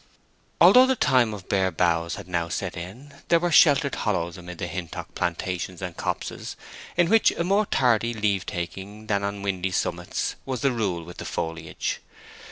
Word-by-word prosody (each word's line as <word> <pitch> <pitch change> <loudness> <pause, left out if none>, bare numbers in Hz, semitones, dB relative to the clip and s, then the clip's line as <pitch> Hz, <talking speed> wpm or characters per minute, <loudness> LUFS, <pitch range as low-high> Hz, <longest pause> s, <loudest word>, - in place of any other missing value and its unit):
Although 255 +1 +8
the 265 - +2
time 125 - +3
of 100 -3 -8
bare 95 -1 +2
boughs 85 -2 +1
had - - -9
now 85 -2 -1
set - - -3
in, 115 +12 -9
there 170 - +4
were 175 +1 0
sheltered 140 -3 +5
hollows 85 -5 -1
amid 90 -1 -9
the - - -3
Hintock 85 0 -6
plantations 90 0 -3
and 90 -2 -5
copses - - -4 0.4
in 175 -1 +4
which 225 +4 +5
a 170 - -1
more 200 +4 +2
tardy 120 -3 +2
leave 100 -3 0
taking 95 +4 -6
than 100 -2 0
on 100 0 -3
windy 95 -2 -1
summits 90 - -2
was 130 -3 -4
the 140 - +3
rule 100 -8 -1
with 85 +1 -11
the - - -6
foliage. 80 0 -3
100 Hz, 175 wpm, -25 LUFS, 90-125 Hz, 0.4 s, Although